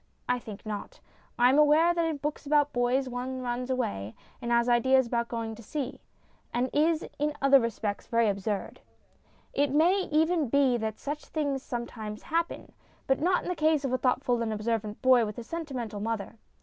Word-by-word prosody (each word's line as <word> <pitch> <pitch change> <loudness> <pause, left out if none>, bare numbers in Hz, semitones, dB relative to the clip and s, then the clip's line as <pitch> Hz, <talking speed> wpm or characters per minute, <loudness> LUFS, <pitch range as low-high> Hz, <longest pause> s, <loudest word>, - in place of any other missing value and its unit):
I 250 0 +1
think 215 -3 -10
not. 210 -2 -6 0.4
I 245 +1 +5
am 280 - +4
aware 305 +3 +5
that 335 -1 +1
in 320 -2 -1
books 290 +1 -4
about 290 0 +3
boys 245 +2 +1
one 255 +1 -4
runs 245 +1 -3
away, 105 - -2 0.3
and 235 - -4
has 235 0 +3
ideas 260 +2 +4
about 235 0 -1
going 230 -1 -4
to 225 - -11
sea, 270 +3 -4 0.5
and 245 +1 -1
is 315 +2 +2
in 300 0 0
other 275 0 +6
respects 220 -3 -3
very 230 -1 +2
absurd. 200 0 -2 0.7
It 285 0 +2
may 345 +7 +3
even 320 -2 +2
be 275 -1 +3
that 220 -1 -3
such 295 +1 -5
things 285 -4 -2
some 240 -2 -4
times 215 -3 -8
happen. 335 +1 -2 0.3
But 265 +1 +1
not 360 +3 +2
in - - -5
the 360 - -1
case 310 -2 +2
of 260 - -1
a - - +3
thoughtful 250 -2 +1
and 225 -1 -1
observant 215 0 -2
boy 255 -2 +6
with 210 -1 -4
a 240 - -5
sentimental 255 -8 -5
mother. 225 0 -3
255 Hz, 190 wpm, -28 LUFS, 230-295 Hz, 0.7 s, other